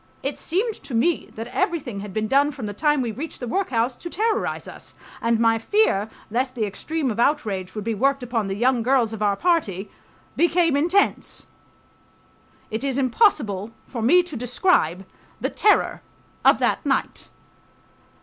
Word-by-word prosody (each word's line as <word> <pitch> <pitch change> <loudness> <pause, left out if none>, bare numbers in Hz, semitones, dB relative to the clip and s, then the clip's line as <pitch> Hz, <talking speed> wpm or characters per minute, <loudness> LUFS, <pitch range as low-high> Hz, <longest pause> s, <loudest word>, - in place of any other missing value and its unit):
It - - -3
seemed 410 +7 0
to 250 - -6
me 325 +9 +1
that 225 - -5
everything 285 - -2
had 205 0 -7
been 215 +2 -1
done 280 +4 +3
from 270 -6 -7
the 205 - -4
time 295 +4 +1
we 235 - -2
reached 290 +9 -7
the 245 - -5
workhouse 250 -7 0
to 345 - -7
terrorize 435 +3 -1
us, - - -9 0.3
and 230 -1 +2
my 225 -1 +3
fear 225 - +2 0.2
lest 255 +3 -1
the 225 -3 0
extreme 275 +7 -2
of 220 - -5
outrage 210 -9 0
would 210 - -4
be 230 +2 -1
worked 275 +5 +1
upon 230 -4 -1
the 195 - -2
young 245 +3 +2
girls 240 -2 +2
of 220 - -6
our 205 -1 +2
party 220 - 0 0.4
became 340 -2 +3
intense. 350 +8 +1 1.3
It 220 +4 -3
is 275 -2 -1
impossible 240 - +2
for 235 - -6
me 350 +11 +5
to 345 -4 -9
describe 240 - +1 0.3
the - - -2
terror 420 - +2 0.4
of - - +6
that - - 0
night. - - -1
250 Hz, 170 wpm, -23 LUFS, 220-315 Hz, 1.3 s, of